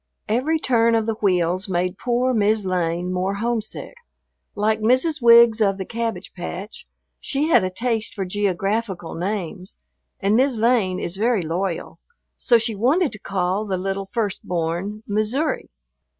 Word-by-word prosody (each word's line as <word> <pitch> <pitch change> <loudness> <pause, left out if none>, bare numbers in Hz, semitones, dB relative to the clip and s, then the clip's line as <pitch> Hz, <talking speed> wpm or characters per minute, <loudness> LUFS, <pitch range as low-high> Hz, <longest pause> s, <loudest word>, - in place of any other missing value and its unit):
Every 260 +9 +1
turn 230 -5 +2
of 225 -1 +1
the 225 - 0
wheels 185 -1 +1
made 180 +1 0
poor 250 +1 +1
"Mis' 215 -1 +2
Lane" 180 0 -1
more 185 +2 -1
homesick. 225 0 -3 0.6
Like 215 +1 +1
Mrs. 260 +7 +2
Wiggs 235 -1 +7
of 195 -2 +2
the 190 - -4
Cabbage 225 -4 -4
Patch, 185 +3 -7 0.3
she 295 +2 -1
had 315 - +5
a 185 - 0
taste 225 +3 -2
for 195 -3 -2
geographical 195 -1 -2
names, 185 0 -4 0.4
and 200 +2 +2
"Mis' 260 0 +2
Lane" 220 -5 +2
is 175 +2 -4
very 225 -2 +1
loyal, 170 +2 -3 0.4
so 240 - +3
she 225 0 -1
wanted 275 - +2
to 210 - -9
call 190 +1 -1
the 195 -3 -2
little 195 +1 -3
first 210 -2 -2
born 175 +5 -3
"Missouri." 215 +9 -1
210 Hz, 150 wpm, -22 LUFS, 185-230 Hz, 0.6 s, Wiggs